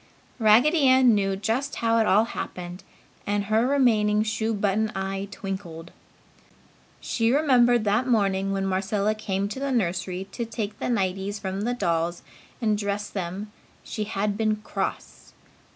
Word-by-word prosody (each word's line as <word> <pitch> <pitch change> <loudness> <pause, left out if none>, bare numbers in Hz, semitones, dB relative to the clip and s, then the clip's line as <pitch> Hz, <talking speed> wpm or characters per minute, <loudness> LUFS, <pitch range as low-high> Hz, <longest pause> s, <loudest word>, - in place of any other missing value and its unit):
Raggedy 250 +8 +5
Ann 260 -2 +6
knew 195 -2 +1
just 225 +8 -2
how 230 0 +2
it 220 - +2
all 200 +4 +5
happened 180 -5 -6 0.4
and 205 0 0
her 220 +4 +2
remaining 215 -6 +3
shoe 220 +1 -1
button 210 +1 0
eye 195 +1 -3
twinkled. 175 -5 -7 1.1
She 230 -1 0
remembered 245 -5 +4
that 215 +5 +1
morning 195 -4 +1
when 195 0 -1
Marcella 195 +2 0
came 200 -2 -2
to 240 - -5
the 275 0 -2
nursery 185 -4 -1
to 235 - -4
take 220 -2 -5
the - - -2
nighties 195 -2 -1
from 195 -1 -4
the 240 +3 -1
dolls 170 -5 -1 0.4
and 215 -4 +1
dress 205 0 -3
them 195 +2 -5 0.3
she 215 - -4
had 205 -1 -1
been 215 -1 +1
cross. 210 - -5
210 Hz, 150 wpm, -25 LUFS, 195-230 Hz, 1.1 s, Ann